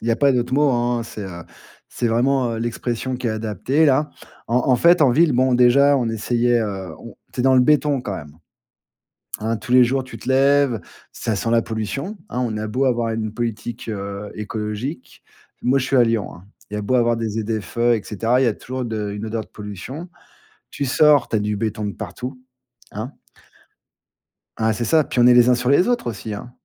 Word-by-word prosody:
Il 115 Hz, -, -4 dB
y -, -, +3 dB
a 115 Hz, -, +2 dB
pas 140 Hz, -2 st, +3 dB
d'autre 125 Hz, 0 st, 0 dB
mot, 145 Hz, 0 st, +3 dB
hein, 120 Hz, 0 st, 0 dB
c'est 115 Hz, -2 st, -9 dB
heu, 85 Hz, -3 st, -7 dB, 0.5 s
c'est 120 Hz, -, -2 dB
vraiment, 125 Hz, +1 st, +1 dB
heu, 115 Hz, -, -4 dB
l'expression 120 Hz, +2 st, -3 dB
qui 125 Hz, -1 st, -4 dB
est -, -, +1 dB
adaptée 110 Hz, -, 0 dB
là. 150 Hz, +1 st, +3 dB, 0.4 s
En 120 Hz, -, 0 dB
en -, -, +6 dB
fait 170 Hz, +5 st, +5 dB
en 135 Hz, -, +5 dB
ville, 155 Hz, +4 st, +4 dB
bon 130 Hz, +1 st, +3 dB
déjà 140 Hz, +3 st, +5 dB
on 120 Hz, -3 st, -1 dB
essayait, 120 Hz, +2 st, +1 dB
heu, 95 Hz, -5 st, -5 dB
on -, -, -11 dB, 0.2 s
tu -, -, -2 dB
es -, -, +1 dB
dans 130 Hz, 0 st, +4 dB
le -, -, +6 dB
béton 145 Hz, 0 st, +3 dB
quand 100 Hz, -6 st, -4 dB
même. 75 Hz, -3 st, -10 dB, 1.1 s
Hein, 110 Hz, +1 st, -1 dB
tous 110 Hz, +3 st, -8 dB
les 125 Hz, 0 st, +7 dB
jours 130 Hz, +2 st, 0 dB
tu 130 Hz, -, -11 dB
te 130 Hz, -, -6 dB
lèves, 135 Hz, -3 st, +3 dB, 0.3 s
ça 110 Hz, -, -2 dB
sent 105 Hz, +4 st, -2 dB
la 115 Hz, 0 st, +3 dB
pollution, 120 Hz, -, -4 dB
hein, 125 Hz, -, -2 dB
on 110 Hz, -3 st, -3 dB
a 110 Hz, 0 st, -3 dB
beau 125 Hz, +6 st, 0 dB
avoir 120 Hz, -3 st, +1 dB
une 110 Hz, -1 st, -3 dB
politique, 120 Hz, 0 st, -4 dB
heu, 100 Hz, 0 st, -5 dB
écologique. 105 Hz, +6 st, -5 dB, 0.4 s
Moi, 135 Hz, +2 st, +3 dB
je 130 Hz, -, -2 dB
suis 135 Hz, -, 0 dB
à 125 Hz, -, +6 dB
Lyon, 115 Hz, -3 st, -1 dB
hein. 85 Hz, -, -15 dB, 0.3 s
Il 105 Hz, -, -5 dB
y -, -, -2 dB
a -, -, -3 dB
beau 115 Hz, +5 st, -1 dB
avoir 120 Hz, -1 st, +3 dB
des 115 Hz, -1 st, -2 dB
ZFE, 110 Hz, +1 st, -4 dB, 0.2 s
et 110 Hz, -, -3 dB
cetera, 115 Hz, +4 st, 0 dB
il 135 Hz, -, +3 dB
y -, -, +3 dB
a 110 Hz, -, +1 dB
toujours 130 Hz, +3 st, -5 dB
de 110 Hz, -3 st, -3 dB
une 105 Hz, +2 st, -5 dB
odeur 110 Hz, +1 st, -3 dB
de -, -, -13 dB
pollution. 105 Hz, -, -8 dB, 0.6 s
Tu 140 Hz, -, -3 dB
sors, 145 Hz, -1 st, +4 dB
tu -, -, -1 dB
as -, -, +2 dB
du 105 Hz, 0 st, -1 dB
béton 110 Hz, 0 st, -2 dB
de 100 Hz, -, -3 dB
partout, 120 Hz, +6 st, -7 dB, 0.5 s
hein. 110 Hz, +6 st, -5 dB, 1.5 s
Hein, 110 Hz, 0 st, +2 dB
c'est 120 Hz, +2 st, -3 dB
ça, 155 Hz, +6 st, +4 dB
puis 130 Hz, -, -3 dB
on 120 Hz, -, +6 dB
est 125 Hz, -, +7 dB
les 120 Hz, 0 st, +6 dB
uns 125 Hz, -, +5 dB
sur 125 Hz, +1 st, -1 dB
les 140 Hz, +6 st, +4 dB
autres 245 Hz, -, 0 dB
aussi 110 Hz, -1 st, -6 dB
hein. 110 Hz, +4 st, -8 dB
120 Hz, 225 wpm, -21 LUFS, 110-130 Hz, 1.5 s, les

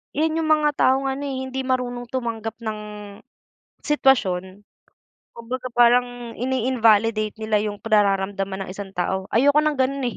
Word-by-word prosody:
yan 315 Hz, +2 st, +1 dB
yung 315 Hz, -, -1 dB
mga 300 Hz, -1 st, +3 dB
taong 265 Hz, +1 st, +3 dB
ano, 280 Hz, +2 st, -4 dB
eh, 270 Hz, -1 st, -3 dB
hindi 265 Hz, 0 st, -4 dB
marunong 245 Hz, -2 st, -2 dB
tumanggap 225 Hz, -3 st, -4 dB
ng 215 Hz, -1 st, -3 dB, 1.1 s
sitwasyon, 205 Hz, -9 st, +1 dB, 0.7 s
kumbaga 245 Hz, +2 st, -6 dB
parang 245 Hz, 0 st, +2 dB
ini-invalidate 225 Hz, -4 st, +1 dB
nila 220 Hz, -1 st, 0 dB
yung 205 Hz, -1 st, -4 dB
nararamdaman 195 Hz, -2 st, 0 dB
ng -, -, -8 dB
isang 200 Hz, -1 st, -7 dB
tao, 190 Hz, +1 st, -2 dB
ayoko 285 Hz, +6 st, +4 dB
ng 305 Hz, -2 st, 0 dB
ganun, 275 Hz, +1 st, 0 dB
eh. -, -, -11 dB
235 Hz, 140 wpm, -22 LUFS, 210-260 Hz, 1.1 s, ayoko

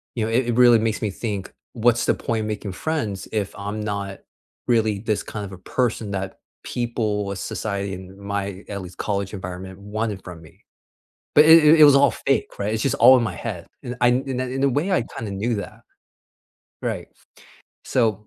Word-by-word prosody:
you 115 Hz, -3 st, 0 dB
know, 115 Hz, -, -3 dB
it 120 Hz, +1 st, +2 dB
it 115 Hz, -, +1 dB
really 120 Hz, -2 st, +7 dB
makes 110 Hz, 0 st, -1 dB
me 105 Hz, -3 st, -1 dB
think 100 Hz, -2 st, -4 dB, 0.2 s
what's 120 Hz, 0 st, +2 dB
the -, -, +3 dB
point 115 Hz, -1 st, -2 dB
in 105 Hz, -, -3 dB
making 105 Hz, -2 st, -4 dB
friends 110 Hz, -12 st, -3 dB
if 105 Hz, -3 st, -1 dB
I'm 100 Hz, +2 st, -4 dB
not 100 Hz, -2 st, -4 dB, 0.5 s
really 110 Hz, -4 st, +2 dB
this 110 Hz, -1 st, -1 dB
kind 105 Hz, -1 st, -6 dB
of 95 Hz, -, -9 dB
a 95 Hz, -, -9 dB
person 110 Hz, 0 st, -1 dB
that 95 Hz, -1 st, -4 dB, 0.2 s
people 110 Hz, -4 st, -2 dB
of 95 Hz, -, -5 dB
society 100 Hz, -2 st, -3 dB
in 95 Hz, +1 st, -10 dB
my 100 Hz, -1 st, -4 dB
at 100 Hz, -2 st, -5 dB
least 90 Hz, 0 st, -10 dB
college 100 Hz, -2 st, -2 dB
environment 95 Hz, 0 st, -7 dB
wanted 105 Hz, -1 st, -4 dB
from 90 Hz, -2 st, -9 dB
me. 80 Hz, -, -18 dB, 0.7 s
But 150 Hz, -, +8 dB
it 160 Hz, 0 st, +8 dB
it 155 Hz, +1 st, +7 dB
it -, -, +11 dB
was 145 Hz, -2 st, +8 dB
all 140 Hz, 0 st, +5 dB
fake. 135 Hz, 0 st, -1 dB
Right? 100 Hz, +2 st, -1 dB
It's 110 Hz, 0 st, -1 dB
just 135 Hz, -, +1 dB
all 130 Hz, +2 st, +8 dB
in 125 Hz, -, +2 dB
my 95 Hz, -, -3 dB
head. -, -, -6 dB, 0.2 s
And 125 Hz, +1 st, -5 dB
I 120 Hz, -, +4 dB
and 125 Hz, +2 st, +1 dB
and 130 Hz, -1 st, -2 dB
in 130 Hz, +1 st, -2 dB
a 140 Hz, -, +5 dB
way, 150 Hz, +9 st, 0 dB
I 180 Hz, -, +3 dB
kinda 110 Hz, -3 st, -4 dB
knew 110 Hz, +4 st, -1 dB
that. 105 Hz, +2 st, -7 dB, 1.0 s
Right. -, -, -3 dB, 0.8 s
So, 110 Hz, -4 st, 0 dB
110 Hz, 205 wpm, -23 LUFS, 100-120 Hz, 1.0 s, it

